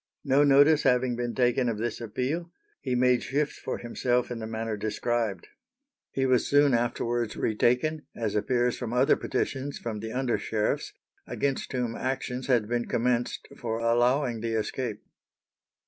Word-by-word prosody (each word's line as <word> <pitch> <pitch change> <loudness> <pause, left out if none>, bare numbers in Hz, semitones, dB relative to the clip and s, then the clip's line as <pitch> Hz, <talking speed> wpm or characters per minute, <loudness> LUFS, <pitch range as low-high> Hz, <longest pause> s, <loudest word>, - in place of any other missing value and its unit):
No 140 0 +4
notice 145 +2 +6
having 125 -1 +2
been 120 0 -3
taken 125 0 +2
of 110 - -2
this 120 +2 -3
appeal, 135 +10 -3 0.3
he 130 -3 -1
made 125 -1 +3
shift 145 +2 -1
for - - -5
himself 120 +1 -1
in 120 - -4
the 110 - -5
manner 110 0 -3
described. 110 -2 -2 0.6
He 135 - -1
was 130 -1 +2
soon 145 -1 +4
afterwards 120 -1 0
retaken, 125 +8 +1
as 110 -3 -2
appears 120 +3 +1
from 120 -2 -4
other 125 +2 +4
petitions 140 +1 -2
from 110 -3 -5
the 110 +1 -5
under 125 -1 0
sheriffs, 105 -1 -1 0.3
against 140 -2 -2
whom 125 -3 -2
actions 130 -1 -3
had 120 -5 +2
been 120 +1 -1
commenced 120 0 -1
for 115 -2 -2
allowing 120 +1 +2
the 115 0 -2
escape. 110 0 -3
120 Hz, 155 wpm, -27 LUFS, 115-130 Hz, 0.6 s, notice